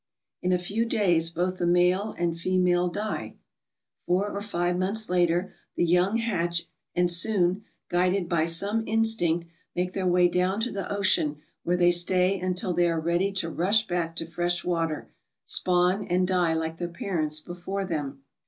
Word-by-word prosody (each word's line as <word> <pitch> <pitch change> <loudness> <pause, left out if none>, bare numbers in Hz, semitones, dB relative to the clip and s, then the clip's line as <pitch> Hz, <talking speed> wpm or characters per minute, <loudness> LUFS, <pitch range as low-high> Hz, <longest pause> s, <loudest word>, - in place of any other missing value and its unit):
In 180 - 0
a 180 - +3
few 200 +6 -1
days 175 -8 +2
both 180 +2 -2
the 175 - 0
male 180 +4 +2
and 170 -1 0
female 180 +1 +1
die. 210 +4 -4 0.7
Four 195 +4 +1
or 200 - -4
five 175 -4 -1
months 200 +2 -1
later 175 +1 +1 0.2
the - - +1
young 180 +5 +2
hatch 170 -7 -1 0.3
and 175 0 +3
soon, 180 +2 +2 0.2
guided 180 +1 +1
by 170 -2 +1
some 200 +7 +1
instinct, 220 -7 +1 0.3
make 180 +1 -1
their 190 -1 -1
way 180 0 +4
down 180 +3 0
to 245 - -1
the 195 0 -4
ocean 185 -7 +1 0.2
where 175 +1 0
they 175 0 +4
stay 180 +2 +3
until 180 0 -2
they 175 0 +2
are 165 -1 0
ready 175 +4 0
to 180 -4 -1
rush 205 +7 +2
back 170 -2 -2
to 165 - -5
fresh 175 +1 -2
water, 165 -3 -1 0.4
spawn, 180 +2 +1
and 180 +1 +1
die 180 -3 +2
like 160 0 -3
their 175 - -2
parents 165 -3 -1
before 180 +4 -5
them. 145 -6 -4
180 Hz, 170 wpm, -26 LUFS, 170-190 Hz, 0.7 s, way